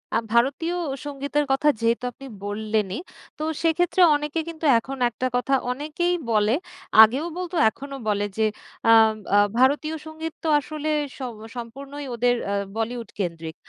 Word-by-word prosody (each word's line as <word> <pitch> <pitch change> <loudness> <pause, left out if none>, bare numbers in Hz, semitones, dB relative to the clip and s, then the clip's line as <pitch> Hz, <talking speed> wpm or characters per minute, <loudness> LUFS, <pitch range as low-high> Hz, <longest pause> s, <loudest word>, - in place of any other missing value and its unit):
আ - - +5 0.2
ভারতীয় 275 +8 +2 0.3
সঙ্গীতের 285 +1 -1
কথা 270 +3 +3
যেহেতু 230 +1 +1
আপনি 275 +3 -13 0.2
বললেনই 210 0 -1 0.4
তো 305 - -2 0.2
সেক্ষেত্রে 350 +2 +2
অনেকে 295 +2 -2
কিন্তু 320 -1 -6
এখন 270 +4 -7
একটা 250 +2 -2
কথা 250 +2 0 0.2
অনেকেই 305 +6 -1 0.2
বলে 215 +3 +3 0.5
আগেও 255 +8 +2
বলতো 360 -1 -4
এখনও 275 +4 -8
বলে 205 0 +1
যে 220 - +3 0.4
আম 225 -1 +7 0.2
আ - - +7 0.2
ভারতীয় 295 +4 +3
সঙ্গীত 315 0 -6
তো - - -2
আসলে 305 +2 -5 0.3
স - - -16 0.4
সম্পূর্ণই 275 +5 -7
ওদের 245 +1 +2
অ্যা 200 - -1 0.2
বলিউড 230 0 -3
কেন্দ্রিক। 165 -3 -3
270 Hz, 145 wpm, -24 LUFS, 225-300 Hz, 0.5 s, আম